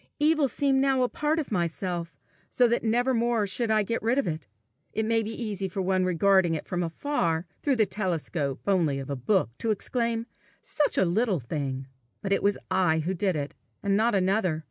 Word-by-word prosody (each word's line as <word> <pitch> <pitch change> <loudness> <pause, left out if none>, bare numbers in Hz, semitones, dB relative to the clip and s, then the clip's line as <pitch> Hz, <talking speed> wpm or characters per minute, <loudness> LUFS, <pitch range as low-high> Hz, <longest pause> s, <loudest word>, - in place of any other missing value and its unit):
Evil 300 -1 +3
seemed 270 0 +1
now 270 -2 +3
a - - +3
part 300 +2 0
of 310 -7 -3
myself, 170 -3 -2 0.3
so 245 - +4
that 235 +1 +1
nevermore 235 -1 +2
should 225 +4 -1
I 215 -1 +3
get 230 +3 -2
rid 230 +4 +1
of 280 - +2
it. 155 -8 -4 0.5
It 220 - 0
may 225 0 +2
be 215 - -4
easy 200 -3 -3
for 190 +1 -3
one 185 0 +1
regarding 185 -1 +3
it - - -5
from 180 -1 -2
afar, 170 - -1 0.2
through 280 -2 +2
the 220 -3 +3
telescope 175 -7 -2
only 170 -8 +2
of 135 +1 -5
a - - -1
book, 160 - +1
to 225 - -1
exclaim, 230 +2 -1 0.3
"Such 295 -1 0
a - - +4
little 195 +1 +1
thing!" 135 +1 -4 0.4
but 195 -1 +1
it - - +1
was 200 0 +2
I 180 -4 +3
who 165 +4 -1
did 190 0 0
it, 145 -1 -3 0.3
and 200 -1 +2
not 225 +2 +2
another! 190 -3 +1
195 Hz, 200 wpm, -27 LUFS, 170-230 Hz, 0.5 s, so